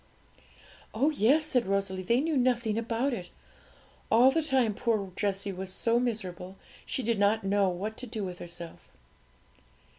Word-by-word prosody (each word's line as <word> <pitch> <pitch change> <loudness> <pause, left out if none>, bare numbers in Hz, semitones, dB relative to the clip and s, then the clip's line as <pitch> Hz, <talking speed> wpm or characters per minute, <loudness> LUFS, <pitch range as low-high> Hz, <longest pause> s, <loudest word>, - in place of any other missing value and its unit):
'Oh 275 +8 +3
yes!' 295 +3 +3
said 250 -7 +1
Rosalie; 195 -1 -1
'they 235 +7 +2
knew 315 0 0
nothing 245 -4 +1
about 230 +4 -1
it. 180 -6 -5 0.8
All 245 +4 +6
the 325 - +1
time 265 -7 +2
poor 205 -3 -1
Jessie 200 0 -1
was 190 +1 -5
so 230 +4 +1
miserable 190 -6 -4 0.3
she 260 - -2
did 230 -2 0
not 210 +2 +3
know 195 0 +2
what 200 +5 -4
to 255 - -7
do 220 -2 -4
with 180 -2 -6
herself.' 170 -1 -10
220 Hz, 155 wpm, -29 LUFS, 195-245 Hz, 0.8 s, All